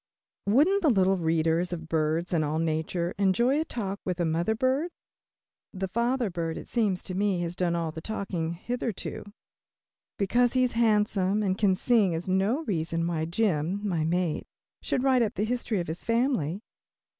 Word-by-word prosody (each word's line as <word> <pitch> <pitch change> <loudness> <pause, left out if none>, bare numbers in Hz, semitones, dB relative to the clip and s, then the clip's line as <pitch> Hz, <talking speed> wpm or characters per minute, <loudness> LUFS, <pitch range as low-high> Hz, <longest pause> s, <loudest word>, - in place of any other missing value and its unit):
Wouldn't 310 - +4
the 320 - +4
little 190 -4 +3
readers 165 +1 +1
of 165 -2 -5
BIRDS 160 +2 0
AND 160 -2 +2
ALL 150 +1 -1
NATURE 165 +2 -1
enjoy 235 +9 +3
a - - +1
talk 200 -9 -4
with 180 -1 -3
a 175 - +2
mother 170 +7 0
bird? 260 +8 +1 0.8
The 190 -1 -3
father 235 +2 0
bird, 165 -2 -3
it - - -8
seems 205 -6 0
to 185 - -5
me, 195 -1 +1
has 170 0 -3
done 175 -2 0
all 165 -2 -1
the 160 - -7
talking 175 -5 -3
hitherto. 230 +3 -4 0.9
Because 240 +5 +2
he 255 -1 +3
is 250 - +1
handsome 210 -3 +2
and 190 -2 +1
can 195 -2 +3
sing 210 -4 +3
is 165 +3 -4
no 195 - +1
reason 165 - -1
why 165 -2 -1
Jim, 185 +1 0
my 170 -5 0
mate, 170 0 -1 0.3
should 255 - -1
write 260 -2 +4
up 225 0 0
the 210 - 0
history 235 -3 -1
of 175 - -3
his 160 +2 -5
family. 230 - 0
190 Hz, 180 wpm, -27 LUFS, 165-230 Hz, 0.9 s, Wouldn't